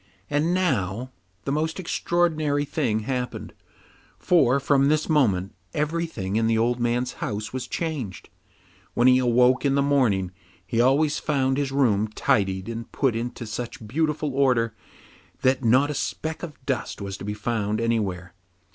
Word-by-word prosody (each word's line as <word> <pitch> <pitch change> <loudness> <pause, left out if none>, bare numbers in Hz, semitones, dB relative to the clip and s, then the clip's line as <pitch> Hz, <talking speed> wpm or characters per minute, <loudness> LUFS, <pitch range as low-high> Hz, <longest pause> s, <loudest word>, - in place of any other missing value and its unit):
And 150 +4 +1
now 130 - 0 0.3
the 140 - -2
most 160 +4 -1
extraordinary 155 -5 0
thing 135 -8 -1
happened, 125 +2 -4 0.6
for 140 -7 +3
from 140 0 +3
this 155 +1 +2
moment 105 - +2 0.2
everything 150 - -2
in 115 0 +2
the 115 0 +2
old 120 +2 +1
man's 120 +1 0
house 105 -5 -3
was 130 -1 -4
changed. 145 - -4 0.6
When 120 - +4
he 130 0 +6
awoke 125 +1 +3
in 140 -1 +2
the 140 - +3
morning 115 -10 +2 0.3
he 115 +5 +1
always 145 +4 +3
found 135 -3 0
his 140 -2 -1
room 110 -7 +2
tidied 95 -3 0
and 115 0 -6
put 135 -5 +1
into 120 +1 -4
such 110 0 -6
beautiful 150 +2 -1
order 125 -4 +2 0.7
that 130 0 +2
not 130 +6 +4
a - - -2
speck 160 +2 -3
of 150 -6 -9
dust 130 -5 -2
was 100 -1 -5
to - - -9
be 105 +1 -3
found 105 0 -1
anywhere. 100 -6 -1
125 Hz, 155 wpm, -25 LUFS, 110-145 Hz, 0.7 s, he